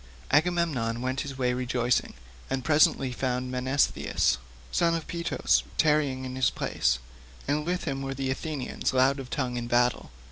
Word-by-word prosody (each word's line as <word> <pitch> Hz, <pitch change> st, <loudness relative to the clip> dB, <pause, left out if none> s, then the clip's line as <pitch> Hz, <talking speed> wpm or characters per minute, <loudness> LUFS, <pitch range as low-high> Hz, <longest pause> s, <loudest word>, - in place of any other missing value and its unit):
Agamemnon 150 Hz, -7 st, +1 dB
went 130 Hz, +1 st, -1 dB
his 135 Hz, -2 st, -6 dB
way 125 Hz, -1 st, +1 dB
rejoicing, 125 Hz, -, 0 dB, 0.3 s
and 130 Hz, -1 st, -2 dB
presently 150 Hz, -4 st, +4 dB
found 125 Hz, 0 st, -2 dB
Menestheus, 130 Hz, -, +1 dB, 0.3 s
son 170 Hz, -1 st, +2 dB
of 165 Hz, -, -3 dB
Peteos, 170 Hz, 0 st, +1 dB, 0.2 s
tarrying 145 Hz, -4 st, +2 dB
in 130 Hz, 0 st, -5 dB
his 130 Hz, 0 st, +3 dB
place, 65 Hz, 0 st, 0 dB, 0.5 s
and 150 Hz, +2 st, 0 dB
with 180 Hz, +1 st, -1 dB
him 135 Hz, -3 st, -3 dB
were 135 Hz, 0 st, -4 dB
the 135 Hz, 0 st, -2 dB
Athenians 140 Hz, -1 st, -3 dB
loud 135 Hz, +2 st, +3 dB
of 130 Hz, -2 st, -7 dB
tongue 125 Hz, -3 st, -2 dB
in 120 Hz, -1 st, -3 dB
battle. 120 Hz, 0 st, +2 dB
130 Hz, 155 wpm, -27 LUFS, 125-150 Hz, 0.5 s, presently